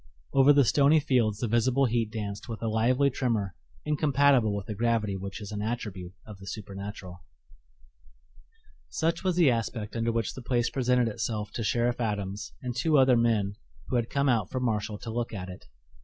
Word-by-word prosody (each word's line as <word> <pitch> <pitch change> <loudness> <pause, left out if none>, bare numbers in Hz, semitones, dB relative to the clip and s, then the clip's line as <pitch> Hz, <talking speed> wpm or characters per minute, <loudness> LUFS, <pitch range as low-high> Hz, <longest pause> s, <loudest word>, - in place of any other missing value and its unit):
Over 135 +1 +6
the 140 -2 +5
stony 145 +5 +4
fields 125 -8 +1
the 120 - -2
visible 120 +4 +2
heat 115 -2 0
danced 105 -1 -5
with 115 0 -6
a - - 0
lively 125 +6 +2
tremor 115 -7 -1 0.3
incompatible 140 -6 +3
with 100 -1 -4
the 110 - -4
gravity 110 -2 0
which 100 +3 -6
is 105 -1 -8
an 105 -1 -4
attribute 105 -5 -4
of 105 -3 -11
the 95 - -12
supernatural. 100 -2 -7 1.7
Such 165 - -1
was 185 -2 +1
the 170 -7 +5
aspect 115 -2 -3
under 115 0 0
which 115 -3 -1
the 130 - -8
place 120 -1 0
presented 125 -2 +2
itself 105 -1 -3
to 115 - -4
Sheriff 120 +2 0
Adams 105 -2 -3
and 125 -1 -4
two 150 +5 +2
other 130 -2 +5
men 110 -4 +1 0.3
who - - -1
had 120 -1 0
come 140 0 0
out 115 -7 +2
from 130 -1 -3
Marshall 105 -2 -1
to 115 +1 -7
look 120 -1 -3
at 95 -2 -6
it. 90 - -11
115 Hz, 185 wpm, -28 LUFS, 105-125 Hz, 1.7 s, Over